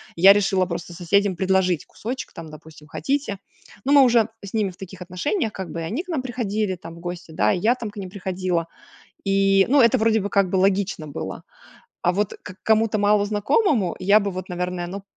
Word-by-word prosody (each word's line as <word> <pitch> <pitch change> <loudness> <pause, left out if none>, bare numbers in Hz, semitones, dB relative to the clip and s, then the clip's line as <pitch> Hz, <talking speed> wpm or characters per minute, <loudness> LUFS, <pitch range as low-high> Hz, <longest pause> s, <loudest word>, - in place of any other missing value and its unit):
я 190 +4 +8
решила 195 -2 +2
просто 170 0 -5
соседям 190 +2 +1
предложить 185 -2 +1
кусочек. 250 +5 -6
Там, 165 -3 -9
допустим, 155 0 -14
хотите? 270 - -2 0.5
Ну 275 - +1
мы 285 - +8
уже 235 -3 +4 0.2
с 195 - -10
ними 215 -3 +1
в 180 - -19
таких 190 -1 -10
отношениях, 205 - -2
как 190 -4 -6
бы, 165 - -5
и - - -4
они 225 - -3
к 370 - -19
нам 315 -6 -1
приходили 215 -6 -2
там 165 -1 -11
в 170 - -12
гости, 175 -1 -7
да, 105 -9 +1
я 220 +7 +2
там 235 -4 -6
к 205 - -17
ним 190 -2 -6
приходила. 185 -3 -2 0.6
И 195 0 +4
ну 285 +2 +5
это 235 +2 +5
вроде 220 -1 +3
бы 200 - -3
как 200 -2 +2
бы - - -1
логично 190 -3 +1
было. 145 - -6 0.6
А 175 - +3
вот 205 +2 -1
к 185 - -10
кому-то 220 -1 +2
малознакомому, 210 - +2
я 200 +3 +5
бы 200 -1 -2
вот 185 +1 -6
наверное, 180 0 -3
ну 195 +2 -6
195 Hz, 205 wpm, -23 LUFS, 180-215 Hz, 0.6 s, я